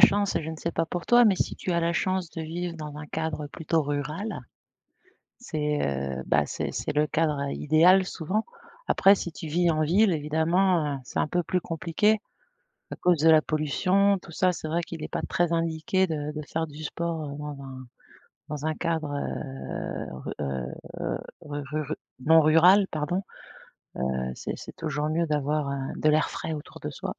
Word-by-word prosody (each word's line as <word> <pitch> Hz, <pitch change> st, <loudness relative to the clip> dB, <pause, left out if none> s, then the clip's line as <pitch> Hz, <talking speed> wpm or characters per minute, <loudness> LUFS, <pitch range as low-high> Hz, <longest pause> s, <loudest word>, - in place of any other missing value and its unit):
chance. 200 Hz, 0 st, +5 dB
Je 160 Hz, -, -4 dB
ne 160 Hz, -, -6 dB
sais 170 Hz, -, -3 dB
pas 165 Hz, -, 0 dB
pour 175 Hz, +1 st, -5 dB
toi, 240 Hz, 0 st, +7 dB
mais 205 Hz, -3 st, +5 dB
si -, -, -2 dB
tu 185 Hz, -, -2 dB
as 170 Hz, -, +2 dB
la 170 Hz, +1 st, +1 dB
chance 185 Hz, -2 st, 0 dB
de 165 Hz, -, -4 dB
vivre 170 Hz, +2 st, -4 dB
dans 150 Hz, -2 st, -7 dB
un 150 Hz, -, -7 dB
cadre 160 Hz, -2 st, -3 dB
plutôt 160 Hz, +2 st, 0 dB
rural 150 Hz, +8 st, -3 dB, 1.0 s
c'est, 150 Hz, -9 st, -1 dB, 0.4 s
heu, 65 Hz, -, -5 dB
bah, 75 Hz, 0 st, +4 dB
c'est -, -, -3 dB
c'est -, -, -2 dB
le 150 Hz, 0 st, +3 dB
cadre 150 Hz, -3 st, 0 dB
idéal 175 Hz, +7 st, +5 dB
souvent. 185 Hz, +6 st, -2 dB, 0.4 s
Après 195 Hz, +1 st, +6 dB
si 175 Hz, -, -4 dB
tu 160 Hz, -, -7 dB
vis 170 Hz, +2 st, +2 dB
en 155 Hz, 0 st, 0 dB
ville 190 Hz, +6 st, +4 dB
évidemment, 160 Hz, 0 st, +2 dB
heu, -, -, -10 dB
c'est -, -, -6 dB
un -, -, +2 dB
peu 175 Hz, +3 st, +1 dB
plus 180 Hz, +2 st, -1 dB
compliqué 170 Hz, +6 st, +1 dB, 0.7 s
à -, -, -5 dB
cause 175 Hz, -3 st, +3 dB
de 160 Hz, +1 st, +6 dB
la 155 Hz, -1 st, +7 dB
pollution 185 Hz, +6 st, +2 dB
tout 170 Hz, -, -13 dB
ça 185 Hz, +2 st, +2 dB
c'est 160 Hz, -, -6 dB
vrai 170 Hz, +2 st, 0 dB
qu'il 165 Hz, -2 st, -7 dB
est -, -, -4 dB
pas -, -, -1 dB
très 175 Hz, -2 st, +1 dB
indiqué 165 Hz, +4 st, +1 dB
de 150 Hz, -2 st, -3 dB
de 150 Hz, -, -4 dB
faire 160 Hz, 0 st, -2 dB
du 150 Hz, 0 st, -10 dB
sport, 165 Hz, -1 st, -3 dB
heu, 145 Hz, -, -6 dB
dans 150 Hz, -1 st, -6 dB
un 130 Hz, -1 st, -9 dB, 0.6 s
dans 150 Hz, 0 st, -4 dB
un 155 Hz, -, +1 dB
cadre, 160 Hz, -3 st, -1 dB
heu, 135 Hz, -1 st, -4 dB
ru -, -, -6 dB
heu, 65 Hz, -3 st, -4 dB, 0.2 s
ru 145 Hz, 0 st, -5 dB, 0.2 s
ru 150 Hz, +1 st, -3 dB, 0.3 s
non 160 Hz, +1 st, +7 dB
rural 180 Hz, +6 st, +6 dB
pardon. 160 Hz, +5 st, -1 dB, 0.9 s
Heu, -, -, -2 dB, 0.2 s
c'est -, -, -4 dB
c'est -, -, -10 dB
toujours 150 Hz, -2 st, -2 dB
mieux 165 Hz, +2 st, +1 dB
d'avoir, 150 Hz, -1 st, 0 dB
heu, 135 Hz, -1 st, -3 dB
de 155 Hz, -, +2 dB
l'air 155 Hz, +1 st, +3 dB
frais 160 Hz, -, -4 dB
autour 150 Hz, -, -8 dB
de -, -, -4 dB
soi. -, -, -5 dB
160 Hz, 195 wpm, -27 LUFS, 150-175 Hz, 1.0 s, toi